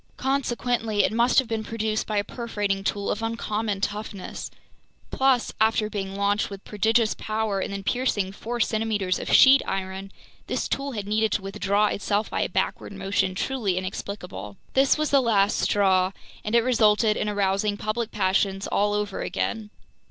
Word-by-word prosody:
Consequently, 245 Hz, -5 st, 0 dB
it -, -, +2 dB
must 235 Hz, +2 st, +2 dB
have 265 Hz, -, +5 dB
been 225 Hz, -1 st, -2 dB
produced 220 Hz, -1 st, -2 dB
by 215 Hz, -, -1 dB
a 205 Hz, -, +2 dB
perforating 205 Hz, -4 st, -3 dB
tool 200 Hz, 0 st, -1 dB
of 215 Hz, -, -3 dB
uncommon 220 Hz, -2 st, -2 dB
toughness—plus, 215 Hz, +5 st, -3 dB
after 220 Hz, -1 st, +2 dB
being 195 Hz, -2 st, -4 dB
launched 200 Hz, +1 st, +1 dB
with 200 Hz, -1 st, -9 dB
prodigious 220 Hz, +2 st, +2 dB
power 215 Hz, -2 st, -2 dB
and 190 Hz, -, -3 dB
then 200 Hz, 0 st, -5 dB
piercing 210 Hz, -4 st, 0 dB
four 235 Hz, +4 st, -5 dB
centimeters 215 Hz, -5 st, 0 dB
of -, -, -4 dB
sheet 270 Hz, +1 st, +8 dB
iron, 190 Hz, 0 st, -4 dB, 0.4 s
this -, -, -1 dB
tool 275 Hz, 0 st, -2 dB
had 205 Hz, -3 st, -4 dB
needed 215 Hz, +1 st, +1 dB
to 200 Hz, -, -1 dB
withdraw 200 Hz, +1 st, +1 dB
itself 205 Hz, +1 st, -1 dB
by -, -, -1 dB
a -, -, 0 dB
backward -, -, -2 dB
motion 195 Hz, -1 st, -1 dB
truly 210 Hz, -4 st, -1 dB
inexplicable. 185 Hz, -, -6 dB, 0.2 s
This 270 Hz, +2 st, +4 dB
was 305 Hz, 0 st, -1 dB
the 280 Hz, -1 st, +5 dB
last 210 Hz, -4 st, +2 dB
straw, 190 Hz, -2 st, +2 dB, 0.3 s
and 210 Hz, +2 st, -1 dB
it 235 Hz, -, +5 dB
resulted 220 Hz, -3 st, +3 dB
in 210 Hz, -, -1 dB
arousing 205 Hz, 0 st, 0 dB
public 215 Hz, +2 st, -2 dB
passions 195 Hz, -1 st, 0 dB
all 205 Hz, 0 st, +1 dB
over 210 Hz, -1 st, -2 dB
again. 220 Hz, -2 st, -3 dB
210 Hz, 165 wpm, -25 LUFS, 195-225 Hz, 0.4 s, sheet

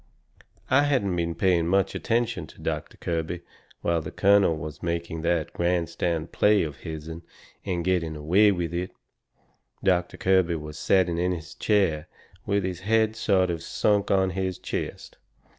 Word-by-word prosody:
I 130 Hz, +2 st, +6 dB
hadn't 120 Hz, -11 st, +1 dB
been 85 Hz, -1 st, -1 dB
paying 85 Hz, -1 st, +2 dB
much 95 Hz, +1 st, +2 dB
attention 115 Hz, -7 st, -1 dB
to -, -, -17 dB
Doctor -, -, -4 dB
Kirby 85 Hz, +1 st, -3 dB, 0.4 s
while 85 Hz, -1 st, +1 dB
the 80 Hz, -, -6 dB
colonel 100 Hz, -4 st, +4 dB
was 75 Hz, 0 st, -7 dB
making 85 Hz, -1 st, -3 dB
that 85 Hz, -1 st, 0 dB
grandstand 85 Hz, -1 st, -1 dB
play 105 Hz, -2 st, +4 dB
of 75 Hz, -4 st, -5 dB
his'n, 80 Hz, +2 st, -7 dB, 0.4 s
and 90 Hz, -3 st, -2 dB
getting 85 Hz, -4 st, 0 dB
away 90 Hz, +8 st, +4 dB
with 85 Hz, -3 st, -2 dB
it. 90 Hz, +2 st, -3 dB, 0.9 s
Doctor 90 Hz, -2 st, +1 dB
Kirby 95 Hz, -3 st, +2 dB
was 75 Hz, -1 st, -7 dB
setting 90 Hz, -3 st, +2 dB
in 90 Hz, +1 st, +1 dB
his 80 Hz, -2 st, -7 dB
chair 90 Hz, -7 st, +1 dB, 0.4 s
with 100 Hz, 0 st, +1 dB
his 90 Hz, -1 st, -3 dB
head 110 Hz, +2 st, +2 dB
sort 95 Hz, -4 st, +2 dB
of 85 Hz, -1 st, -4 dB
sunk 100 Hz, +4 st, +1 dB
on 95 Hz, -1 st, +3 dB
his 95 Hz, 0 st, -2 dB
chest. -, -, -5 dB
90 Hz, 155 wpm, -26 LUFS, 85-95 Hz, 0.9 s, I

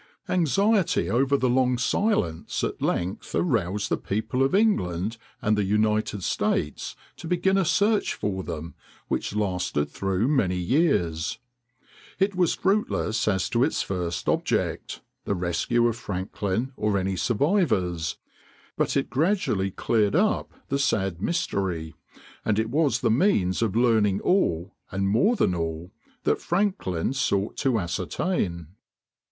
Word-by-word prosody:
Anxiety 195 Hz, +3 st, +2 dB
over 135 Hz, +4 st, +3 dB
the 130 Hz, -, +1 dB
long 125 Hz, 0 st, +2 dB
silence 120 Hz, -, 0 dB
at -, -, -3 dB
length 90 Hz, +3 st, -2 dB
aroused 105 Hz, -, 0 dB
the -, -, +1 dB
people 110 Hz, +5 st, -2 dB
of 135 Hz, +7 st, +3 dB
England 110 Hz, -, +1 dB, 0.3 s
and 105 Hz, -1 st, +3 dB
the 105 Hz, -, +1 dB
United 105 Hz, 0 st, +1 dB
States 75 Hz, -3 st, -1 dB, 0.2 s
to 170 Hz, -, -8 dB
begin 180 Hz, +2 st, +2 dB
a 195 Hz, -, +3 dB
search 205 Hz, +5 st, +2 dB
for 95 Hz, -2 st, -2 dB
them 85 Hz, -2 st, -6 dB, 0.4 s
which -, -, -2 dB
lasted 90 Hz, -7 st, -1 dB
through 95 Hz, +3 st, 0 dB
many 120 Hz, -11 st, +2 dB
years. 90 Hz, -, +1 dB, 0.8 s
It 195 Hz, +1 st, +2 dB
was 180 Hz, -3 st, +2 dB
fruitless 190 Hz, -, 0 dB
as 95 Hz, -3 st, +1 dB
to 120 Hz, 0 st, +3 dB
its 155 Hz, -, +1 dB
first 90 Hz, -3 st, -3 dB
object,—the 100 Hz, -, -2 dB
rescue 90 Hz, +7 st, +1 dB
of 115 Hz, -1 st, -1 dB
Franklin 100 Hz, +5 st, -3 dB
or 105 Hz, -4 st, 0 dB
any 95 Hz, 0 st, -1 dB
survivors,—but 95 Hz, -, -1 dB
it -, -, -1 dB
gradually 140 Hz, -, +1 dB
cleared 105 Hz, +4 st, +1 dB
up 210 Hz, +5 st, +1 dB, 0.2 s
the 140 Hz, -, 0 dB
sad 95 Hz, -10 st, 0 dB
mystery, 95 Hz, -, -1 dB, 0.5 s
and 105 Hz, -2 st, +1 dB
it 110 Hz, +1 st, 0 dB
was 140 Hz, -5 st, +2 dB
the -, -, +2 dB
means 110 Hz, -, +2 dB
of 110 Hz, -3 st, 0 dB
learning 110 Hz, -5 st, +3 dB
all, 95 Hz, -, +1 dB, 0.2 s
and 95 Hz, +1 st, -1 dB
more 190 Hz, -, +3 dB
than 95 Hz, -, +2 dB
all, 80 Hz, +1 st, -4 dB, 0.3 s
that -, -, +1 dB
Franklin 175 Hz, -, 0 dB
sought 105 Hz, -7 st, 0 dB
to 130 Hz, -5 st, +1 dB
ascertain. 85 Hz, -, -2 dB
110 Hz, 135 wpm, -25 LUFS, 90-150 Hz, 0.8 s, over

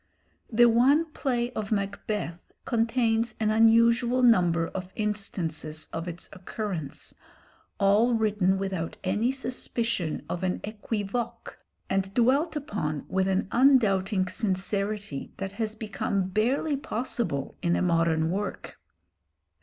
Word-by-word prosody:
The 240 Hz, +2 st, +6 dB
one 270 Hz, +8 st, +4 dB
play 245 Hz, -5 st, -1 dB
of 215 Hz, -4 st, -5 dB
'Macbeth' 200 Hz, -3 st, -3 dB
contains 230 Hz, -1 st, +1 dB
an 215 Hz, -1 st, +2 dB
unusual 230 Hz, +3 st, +4 dB
number 175 Hz, -8 st, +4 dB
of 185 Hz, -1 st, -6 dB
instances 165 Hz, -7 st, -2 dB
of 165 Hz, +2 st, -4 dB
its 175 Hz, 0 st, -5 dB
occurrence, 185 Hz, -5 st, -5 dB, 0.7 s
all 210 Hz, +5 st, +4 dB
written 210 Hz, -4 st, +2 dB
without 190 Hz, -4 st, -3 dB
any 210 Hz, +6 st, +1 dB
suspicion 235 Hz, -, -2 dB
of 175 Hz, -, -4 dB
an 185 Hz, -1 st, 0 dB
équivoque 215 Hz, +2 st, -4 dB, 0.3 s
and 195 Hz, 0 st, -1 dB
dwelt 275 Hz, +7 st, +3 dB
upon 205 Hz, -, -3 dB
with 190 Hz, 0 st, +1 dB
an 190 Hz, 0 st, 0 dB
undoubting 210 Hz, -7 st, +3 dB
sincerity 200 Hz, -, -2 dB
that 195 Hz, -1 st, -4 dB
has 215 Hz, +1 st, -3 dB
become 200 Hz, -3 st, -2 dB
barely 255 Hz, +9 st, +1 dB
possible 230 Hz, -, -2 dB
in 170 Hz, 0 st, +2 dB
a -, -, 0 dB
modern 165 Hz, -2 st, +2 dB
work. 200 Hz, +2 st, -4 dB
210 Hz, 115 wpm, -27 LUFS, 185-235 Hz, 0.7 s, The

